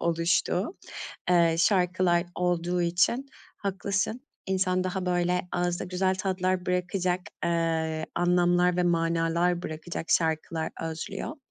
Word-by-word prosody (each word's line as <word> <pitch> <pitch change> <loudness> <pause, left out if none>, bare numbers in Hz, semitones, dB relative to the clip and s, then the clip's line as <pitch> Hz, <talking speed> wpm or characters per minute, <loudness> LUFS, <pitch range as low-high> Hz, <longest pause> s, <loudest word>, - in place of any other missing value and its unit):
oluştuğu, 170 - +1 0.5
eee, 170 -2 +5
şarkılar 180 -1 +3
olduğu 175 0 0
için 180 +10 +2 0.3
haklısın. 200 +4 -2 0.3
İnsan 185 -1 +1
daha, 185 0 -2
böyle, 180 0 +1
ağızda 175 0 0
güzel 185 +1 0
tatlar 185 -1 -1
bırakacak, 180 0 0 0.2
eee, 165 -2 0
anlamlar 175 0 +3
ve 180 - +2
manalar 170 +1 +1
bırakacak 160 +1 -5
şarkılar 160 0 +1
özlüyor. 180 - -5
180 Hz, 105 wpm, -27 LUFS, 170-185 Hz, 0.5 s, eee